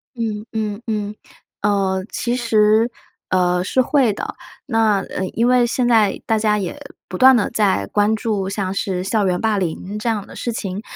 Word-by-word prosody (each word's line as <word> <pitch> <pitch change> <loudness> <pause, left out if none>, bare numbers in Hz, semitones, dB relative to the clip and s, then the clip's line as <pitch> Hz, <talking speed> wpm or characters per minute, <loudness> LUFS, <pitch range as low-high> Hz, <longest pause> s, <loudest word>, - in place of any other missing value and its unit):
嗯 220 -2 -3
嗯 215 -1 -3
嗯， 210 -1 -2 0.5
呃， 195 -2 +1
其 240 +1 -1
实， 220 -1 +3 0.4
呃， 180 -1 +2
是 260 +7 +2
会 255 -3 +2
的， - - -5 0.3
那， 225 -6 +2
呃， 190 - -4
因 235 +2 +2
为 250 -1 +4
现 240 +1 0
在 220 -4 +3
大 220 - +1
家 210 -1 +2
也 185 -4 -4 0.3
不 185 - -6
断 260 +3 +7
地 220 - +1
在 200 - +1
关 210 +1 +2
注， 210 -4 -2
像 195 -2 -2
是 185 -2 -2
校 205 +2 0
园 180 -1 0
霸 220 -2 +1
凌 190 +3 -3
这 230 - -1
样 210 -3 -2
的 - - -13
事 240 - -3
情。 195 -3 -4
210 Hz, 195 characters per minute, -20 LUFS, 195-225 Hz, 0.5 s, 断